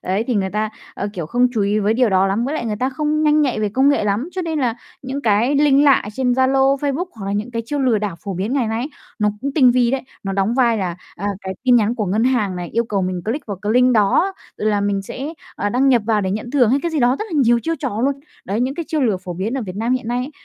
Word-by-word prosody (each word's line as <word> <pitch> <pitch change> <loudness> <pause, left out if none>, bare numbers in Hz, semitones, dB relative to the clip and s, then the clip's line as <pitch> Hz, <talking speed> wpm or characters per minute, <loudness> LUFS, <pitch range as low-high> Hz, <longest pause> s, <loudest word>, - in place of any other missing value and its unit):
ấy, 195 +5 -1
thì 250 - 0
người 190 -2 0
ta, 215 +1 -1 0.2
ờ, 200 - -3
kiểu, 170 -6 -5
không 245 +7 +2
chú 220 - -1
ý 205 +2 +1
với 210 +2 +1
điều 250 -1 +3
đó 190 -1 +3
lắm, 205 +5 0
với 280 - -2
lại 240 -7 -3
người 210 -1 -2
ta 255 +4 0
không 300 +3 -1
nhanh 305 0 +4
nhạy 250 -6 0
về 210 - +1
công 265 +7 +3
nghệ 285 -7 +2
lắm. 210 - -1
Cho 370 - -3
nên 320 -2 -2
là 245 -5 0 0.3
những 270 +2 -4
cái 225 +4 +2
link 290 0 +4
lạ 280 -2 +5
trên 250 +1 0
Zalo, 265 +2 +3
Facebook 290 +6 -1
hoặc 200 -4 -7
là 200 - -2
những 210 +4 -2
cái 230 -1 -3
chiêu 290 +2 -2
lừa 250 -5 +2
đảo 200 -5 -3
phổ 195 -2 -4
biến 200 +8 -2
ngày 260 -5 +1
nay 225 +1 -2
ấy, 275 - -4 0.3
nó 210 -1 +2
cũng 280 - -2
tinh 255 -5 +6
vi 245 -1 +2
đấy, 270 0 -1 0.2
nó 195 - -3
đóng 195 +4 0
vai 235 -4 +3
là, 180 -3 -3 0.2
à, 200 - -4
cái 190 0 -5
tin 250 -2 +5
nhắn 225 +1 +2
của 215 -5 -2
ngân 210 +5 +1
hàng 220 -8 +1
này 175 -1 -5
yêu 235 +1 +1
cầu 200 -3 -1
mình 185 -1 -2
click 235 +7 -3
vào 200 -3 -4
cái 210 - 0
link 250 +1 +4
đó 220 - +3 0.2
là 210 -1 0
mình 200 -1 0
sẽ, 280 +10 -6 0.2
ờ, 205 - -1
đăng 255 +5 +2
nhập 245 -4 +4
vào 215 -2 +2
để 190 - -1
nhận 215 +4 -4
thưởng 250 -5 +3
hay 275 - +3
cái 340 - -1
gì 310 - -1
đó, 245 +2 +3
rất - - -3
là 305 - +1
nhiều 235 0 +4
chiêu 330 - -1
trò 250 -6 -3
luôn. 275 +3 +1 0.3
Đấy, 205 +5 -2
những 260 +2 0
cái 335 +1 -4
chiêu 310 - 0
lừa 225 -7 +2
phổ 185 -1 -7
biến 205 +8 -3
ở 255 - -3
Việt 190 -1 -7
Nam 230 +3 0
hiện 255 -3 -2
nay 245 +1 0
ấy 255 +3 -4
235 Hz, 305 wpm, -20 LUFS, 205-265 Hz, 0.3 s, tinh